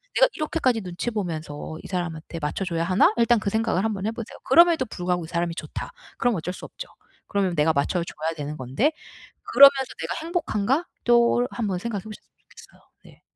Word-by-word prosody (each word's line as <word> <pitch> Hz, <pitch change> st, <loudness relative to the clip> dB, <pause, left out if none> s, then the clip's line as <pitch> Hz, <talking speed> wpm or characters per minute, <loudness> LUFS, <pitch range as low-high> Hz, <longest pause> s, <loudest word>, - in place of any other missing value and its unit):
내가 -, -, +6 dB
이렇게까지 265 Hz, -7 st, 0 dB
눈치 180 Hz, +6 st, -4 dB
보면서 160 Hz, -6 st, -5 dB
이 -, -, -8 dB
사람한테 170 Hz, -3 st, -4 dB
맞춰 150 Hz, +5 st, -2 dB
줘야 170 Hz, -2 st, -1 dB
하나?' 185 Hz, +3 st, +4 dB
일단 235 Hz, 0 st, +4 dB
그 200 Hz, -, -1 dB
생각을 220 Hz, -3 st, 0 dB
한번 205 Hz, -3 st, -2 dB
해 220 Hz, -, 0 dB
보세요. 230 Hz, -1 st, -8 dB
그럼에도 330 Hz, -1 st, +5 dB
불구하고 180 Hz, -4 st, -2 dB
'이 -, -, -10 dB
사람이 170 Hz, 0 st, -2 dB
좋다.' -, -, -6 dB, 0.3 s
그럼 245 Hz, -4 st, +1 dB
어쩔 180 Hz, +2 st, -4 dB
수 -, -, -11 dB
없죠. -, -, -9 dB, 0.4 s
그러면 195 Hz, -3 st, 0 dB
내가 155 Hz, +2 st, +3 dB
맞춰 145 Hz, +5 st, 0 dB
줘야 160 Hz, -1 st, -4 dB
되는 150 Hz, 0 st, -5 dB
건데 135 Hz, -, 0 dB, 0.6 s
그러면서 275 Hz, -1 st, +7 dB
'내가 -, -, -3 dB
행복한가?' 320 Hz, -, 0 dB, 0.2 s
또 240 Hz, 0 st, +4 dB
한번 205 Hz, -6 st, -2 dB
생각해 205 Hz, 0 st, -4 dB
보셨으면 215 Hz, -1 st, -11 dB
좋겠어요. -, -, -17 dB, 0.2 s
네. -, -, -18 dB
200 Hz, 420 characters per minute, -24 LUFS, 170-240 Hz, 0.6 s, 그러면서